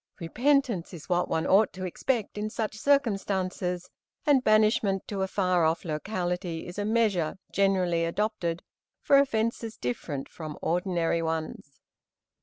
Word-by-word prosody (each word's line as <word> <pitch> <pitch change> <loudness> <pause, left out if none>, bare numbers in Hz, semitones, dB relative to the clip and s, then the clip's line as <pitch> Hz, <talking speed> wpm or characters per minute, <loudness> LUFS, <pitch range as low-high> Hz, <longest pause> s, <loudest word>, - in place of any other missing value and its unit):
Repentance 240 - +1
is 165 - -12
what 175 0 +1
one 160 0 0
ought 205 +3 +4
to 185 0 -5
expect 225 +5 -2
in 210 +1 -3
such 220 -1 -3
circumstances, 195 -8 0 0.4
and 280 -4 +4
banishment 215 -3 +3
to 200 -2 -3
a 190 - +1
far 185 -3 +1
off 160 +2 +1
locality 175 0 -3
is 180 +3 -7
a 205 - -1
measure 210 -7 +1
generally 185 -4 +2
adopted 175 -2 -2 0.4
for 275 - +5
offences 230 -3 0
different 135 +3 -4
from 155 -3 -8
ordinary 170 -1 0
ones. 160 -3 -4
190 Hz, 135 wpm, -28 LUFS, 170-220 Hz, 0.4 s, for